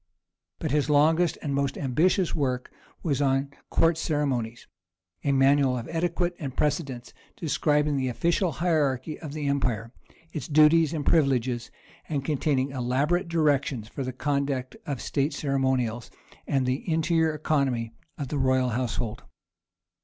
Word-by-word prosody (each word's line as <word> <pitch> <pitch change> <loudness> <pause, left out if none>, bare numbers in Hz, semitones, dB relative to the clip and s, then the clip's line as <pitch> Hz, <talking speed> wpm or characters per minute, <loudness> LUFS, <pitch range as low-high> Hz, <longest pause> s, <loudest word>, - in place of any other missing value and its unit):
But 155 - -3
his 150 0 +1
longest 160 +4 +3
and 145 -3 -2
most 140 -1 0
ambitious 165 +7 +1
work 130 -5 -1 0.3
was 145 -4 0
on 135 0 +1 0.2
Court 165 0 +2
Ceremonies, 130 -8 -1 0.6
a 140 - +2
manual 135 -1 +4
of 115 - -5
etiquette 175 +1 0
and 135 -4 -6
precedence, 140 -5 -1 0.2
describing 150 -2 +1
the 130 -1 0
official 170 - +1
hierarchy 155 -4 0
of 150 -4 -7
the 150 -1 -4
empire, 125 -5 -1 0.4
its 150 -7 -4
duties 155 +1 +5
and 155 -4 -3
privileges, 125 -6 +2 0.4
and 140 -4 -2
containing 140 -2 0
elaborate 140 +8 0
directions 145 -8 +1
for 135 - -5
the 130 - -3
conduct 140 -1 -2
of 140 -4 -2
state 140 +2 0
ceremonials 130 -5 0 0.4
and 135 -2 +1
the 130 +7 -2
interior 160 0 +2
economy 135 -7 0 0.2
of 140 -4 -4
the 145 - -1
royal 130 -1 +2
household. 120 -1 -2
140 Hz, 140 wpm, -26 LUFS, 130-155 Hz, 0.6 s, duties